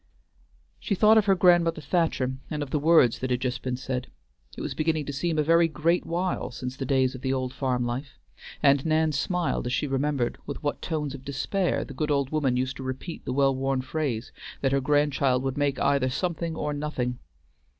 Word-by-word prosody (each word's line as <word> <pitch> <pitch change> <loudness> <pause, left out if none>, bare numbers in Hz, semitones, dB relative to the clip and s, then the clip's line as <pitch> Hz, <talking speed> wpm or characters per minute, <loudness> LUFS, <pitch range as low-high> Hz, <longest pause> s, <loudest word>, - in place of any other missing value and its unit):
She 200 - -1
thought 215 +3 +6
of 210 - 0
her 195 - +5
grandmother 175 -3 +4
Thacher, 155 -4 0 0.2
and 150 -1 -2
of 135 - -9
the 150 - +1
words 155 -6 +4
that 130 - -3
had 125 -1 +1
just 130 0 -2
been 125 -1 -2
said; 130 -1 -4 0.5
it - - -5
was - - -3
beginning 155 -1 0
to 145 - -4
seem 160 +3 -1
a 155 - +3
very 165 +2 +4
great 165 +2 0
while 175 +2 -1
since 125 +1 -6
the 135 -1 -5
days 130 -1 +2
of 130 - -8
the 130 - -1
old 130 -1 -2
farm 130 -3 -1
life, 135 +5 -4 0.5
and 140 -1 +5
Nan 160 0 +2
smiled 165 0 -1
as 125 - -2
she 150 - 0
remembered 135 -2 -1
with - - -6
what 145 - -2
tones 150 -4 -2
of 135 -2 -9
despair 175 +7 -1
the 140 - -9
good 150 +3 -2
old 140 -2 +1
woman 140 -5 +1
used 130 +1 -2
to 135 - -7
repeat 130 +6 -6
the - - -2
well 135 0 +3
worn 135 0 -1
phrase, 130 -4 -3 0.3
that 135 - +1
her 140 0 +2
grandchild 140 -2 +2
would 135 -1 -2
make 145 -2 0
either 140 -2 +2
something 170 +3 -2
or 150 -2 -2
nothing. 140 -4 -3
140 Hz, 210 wpm, -26 LUFS, 130-155 Hz, 0.5 s, thought